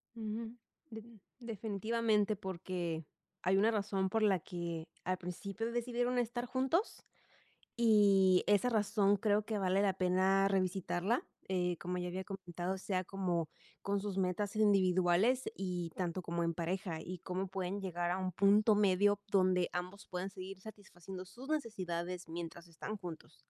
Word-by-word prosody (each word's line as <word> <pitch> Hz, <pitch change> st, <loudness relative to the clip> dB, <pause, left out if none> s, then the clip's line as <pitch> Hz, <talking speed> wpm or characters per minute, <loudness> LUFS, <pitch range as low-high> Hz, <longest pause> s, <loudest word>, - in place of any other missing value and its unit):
Ujú, 225 Hz, +1 st, -4 dB, 0.3 s
de 220 Hz, -2 st, -8 dB, 0.4 s
definitivamente 220 Hz, -1 st, 0 dB
porque 175 Hz, -4 st, -4 dB, 0.4 s
hay 190 Hz, +1 st, +3 dB
una 215 Hz, +3 st, +4 dB
razón 200 Hz, -3 st, 0 dB
por 220 Hz, +2 st, +1 dB
la 195 Hz, -3 st, +4 dB
que 170 Hz, -1 st, -5 dB, 0.2 s
al 185 Hz, 0 st, 0 dB
principio 195 Hz, +5 st, -4 dB
decidieron 245 Hz, +1 st, 0 dB
estar 240 Hz, 0 st, -1 dB
juntos 265 Hz, -, 0 dB, 0.7 s
y 200 Hz, -5 st, +5 dB
esa 205 Hz, +4 st, +4 dB
razón 205 Hz, -3 st, +3 dB
creo 205 Hz, +1 st, +2 dB
que 215 Hz, -1 st, -2 dB
vale 190 Hz, 0 st, +2 dB
la 200 Hz, -1 st, +3 dB
pena 190 Hz, +2 st, +3 dB
revisitarla, 190 Hz, +3 st, 0 dB, 0.2 s
eh, 180 Hz, -2 st, 0 dB
como 180 Hz, +1 st, -3 dB
ya 180 Hz, 0 st, -2 dB
había 185 Hz, +2 st, -4 dB
comentado, 185 Hz, -1 st, -4 dB
sea 185 Hz, -1 st, -1 dB
como 180 Hz, -4 st, -1 dB, 0.3 s
con 200 Hz, 0 st, 0 dB
sus 200 Hz, -1 st, -3 dB
metas 190 Hz, +3 st, 0 dB
individuales 195 Hz, +3 st, +4 dB
y 180 Hz, -3 st, -3 dB
tanto 180 Hz, 0 st, -2 dB
como 170 Hz, 0 st, -2 dB
en 170 Hz, 0 st, 0 dB
pareja 170 Hz, 0 st, -2 dB
y 185 Hz, +1 st, -6 dB
cómo 185 Hz, +2 st, -3 dB
pueden 190 Hz, +1 st, -3 dB
llegar 175 Hz, -2 st, -2 dB
a 180 Hz, -, 0 dB
un 185 Hz, -1 st, -2 dB
punto 205 Hz, +4 st, +5 dB
medio 205 Hz, 0 st, +3 dB
donde 185 Hz, -2 st, +3 dB
ambos 180 Hz, +3 st, -5 dB
pueden 185 Hz, +2 st, -4 dB
seguir 190 Hz, 0 st, -8 dB
satisfaciendo 190 Hz, -3 st, -9 dB
sus 245 Hz, +8 st, -11 dB
necesidades 180 Hz, -, -3 dB
mientras 170 Hz, +1 st, -6 dB
están 170 Hz, +6 st, -6 dB
juntos. 175 Hz, -5 st, -9 dB
190 Hz, 150 wpm, -35 LUFS, 180-210 Hz, 0.7 s, y